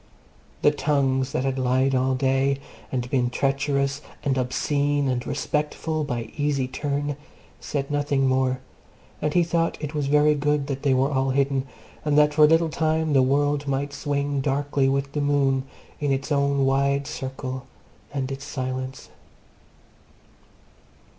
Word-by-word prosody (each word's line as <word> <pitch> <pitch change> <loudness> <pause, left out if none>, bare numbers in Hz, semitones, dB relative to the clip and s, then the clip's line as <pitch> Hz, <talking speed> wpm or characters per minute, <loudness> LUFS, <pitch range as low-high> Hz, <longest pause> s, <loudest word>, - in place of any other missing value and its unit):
The 145 - +6
tongues 135 -3 +1
that 125 - -1
had 135 -1 -1
lied 130 +1 +2
all 130 0 +2
day, 135 +1 +2 0.3
and 125 -2 -2
been 125 -3 +2
treacherous 140 +1 0 0.2
and 135 -2 +1
obscene 140 +2 0
and 125 -2 -1
respectful 150 +2 -1
by 120 -5 -4
easy 145 -3 0
turn, 145 +2 -2 0.4
said 140 -1 -3
nothing 145 -2 +1
more; 130 0 +1 0.6
and 150 +1 -1
he 175 - +5
thought 165 0 0
it 150 0 -5
was 145 -2 -1
very 150 +1 +4
good 150 -1 0
that 135 -1 -4
they 135 -3 +3
were 135 +3 +2
all 135 -1 +1
hidden, 135 0 +1 0.4
and 150 -1 +1
that 150 0 +5
for 150 0 +7
a - - +6
little 165 +1 +3
time 160 -1 0
the 135 - +5
world 145 +2 +1
might 140 +1 -1
swing 140 -1 -1
darkly 140 0 +1
with 140 0 -1
the 150 - -2
moon 135 -2 +2 0.3
in 145 -2 0
its 135 +3 -2
own 140 -1 +2
wide 140 +1 +2
circle 130 -2 -5 0.4
and 135 -2 -3
its 135 0 -5
silence. 130 -1 -4
140 Hz, 155 wpm, -24 LUFS, 135-145 Hz, 0.6 s, for